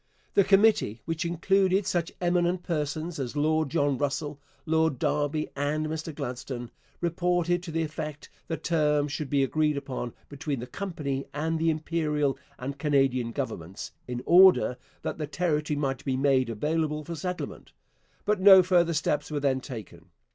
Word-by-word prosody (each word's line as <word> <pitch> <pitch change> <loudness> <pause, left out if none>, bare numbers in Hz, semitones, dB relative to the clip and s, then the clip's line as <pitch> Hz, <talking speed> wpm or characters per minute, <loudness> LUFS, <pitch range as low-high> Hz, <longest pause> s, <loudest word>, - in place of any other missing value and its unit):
The 200 - +5
committee, 195 - +3
which 165 +2 -2
included 190 +3 +2
such 175 -2 -1
eminent 175 0 +1
persons 155 0 -3
as 130 0 -4
Lord 155 0 +1
John 145 -3 +1
Russell, 145 +1 -2 0.2
Lord 160 -3 +2
Derby, 150 +3 0
and 145 +2 -1
Mr 160 +1 -4
Gladstone, 125 -1 -5 0.3
reported 175 0 +1
to 175 -2 -7
the 165 +1 0
effect 155 -1 -6 0.2
that 165 - -4
terms 150 -3 +2
should 145 -1 -4
be 140 -1 +3
agreed 150 +1 +1
upon 130 -4 -4
between 145 -2 -4
the 120 - -5
company 145 -6 -4
and 160 +2 -1
the 165 0 +2
Imperial 155 -3 0 0.2
and 140 +2 -5
Canadian 135 -5 +2
governments, 95 - -5 0.2
in 125 0 -4
order 180 -7 +6 0.3
that - - -4
the 150 - -2
territory 150 -1 0
might 135 -3 -2
be 130 -2 -1
made 135 -2 +3
available 150 +6 -1
for 170 - -5
settlement; 180 +3 -5 0.5
but 210 -2 +1
no 190 -1 +9
further 175 -2 +3
steps 150 -1 0
were 150 -1 -2
then 135 -2 +1
taken. 115 -7 -9
150 Hz, 155 wpm, -27 LUFS, 140-170 Hz, 0.5 s, no